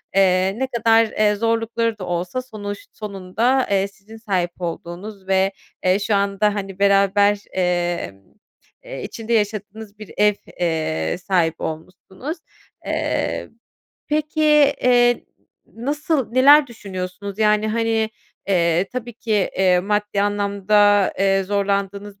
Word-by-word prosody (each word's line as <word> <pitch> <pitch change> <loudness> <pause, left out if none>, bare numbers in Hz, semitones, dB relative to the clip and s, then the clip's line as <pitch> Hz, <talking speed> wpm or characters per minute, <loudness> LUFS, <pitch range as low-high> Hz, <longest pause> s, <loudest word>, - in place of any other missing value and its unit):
Eee, 190 0 +3
ne 265 - 0
kadar, 230 -2 +3
eee, 210 -1 +1
zorlukları 230 0 -1
da 185 - -5
olsa 175 +8 -2
sonuç 205 -5 -7
sonunda, 215 +6 -1
eee, 195 0 +2
sizin 215 +2 -15
sahip 185 -5 -2
olduğunuz 180 +4 -6
ve, 190 0 +2 0.3
eee, 185 +2 +3
şu 205 0 0
anda, 200 +1 +1
hani, 195 -1 -5
beraber, 200 +1 +4
emm, 175 - -1 0.6
eee, - - -7
içinde 230 +1 -4
yaşadığınız 210 0 -2
bir 215 - -10
ev, 210 0 +4 0.3
eee, 160 - -1
sahibi 175 -3 0
olmuşsunuz. 185 - -6 0.5
Eee, - - -2 0.6
peki, 305 +1 -1 0.4
eee, 245 -1 +4 0.4
nasıl 285 +1 -2
neler 280 +3 +7
düşünüyorsunuz? 200 -2 -7
Yani, 215 0 +3
hani, 225 0 0 0.4
eee, 170 -1 +2
tabii 245 -1 -5
ki, 225 0 -9 0.3
eee, 180 -2 +4
maddi 205 +1 0
anlamda, 205 0 +2
eee, 195 0 +2
zorlandığınız 200 0 -2
205 Hz, 120 wpm, -21 LUFS, 190-225 Hz, 0.6 s, neler